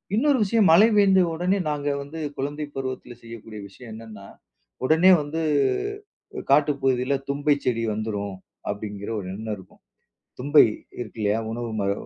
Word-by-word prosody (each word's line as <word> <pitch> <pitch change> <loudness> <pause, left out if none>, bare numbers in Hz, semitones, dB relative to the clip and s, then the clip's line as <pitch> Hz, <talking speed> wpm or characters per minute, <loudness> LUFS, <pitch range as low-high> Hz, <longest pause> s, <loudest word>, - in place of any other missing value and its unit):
இன்னொரு 280 +4 +3
விஷயம், 210 -1 +3
மழை 200 +7 +7
பெய்ந்த 195 -2 +5
உடனே 180 +4 0
நாங்க 145 -1 -2
வந்து 145 +4 -8 0.2
குழந்தை 145 +3 -3
பருவத்தில 130 -2 -5
செய்யக்கூடிய 115 -2 -10
விஷயம் 115 +4 -13
என்னன்னா 110 -3 -10 0.6
"உடனே 160 +6 +6
வந்து 150 +3 -4 1.1
காட்டு 145 +2 +5
பகுதியில 130 0 +1 0.2
தும்பைச் 145 0 +1
செடி 115 -2 0
வந்துரும்" 105 -2 -3 0.3
அப்படிங்கிற 105 0 -5
ஒரு 95 - -7
எண்ணம் 110 +1 -4
இருக்கும். 95 -1 -17 0.6
தும்பை 145 +4 +6 0.4
இருக்கு 115 -2 -8
இல்லையா? 105 +1 +1
உணவு 120 +1 -4
மர 100 0 0
130 Hz, 140 wpm, -24 LUFS, 110-155 Hz, 1.1 s, மழை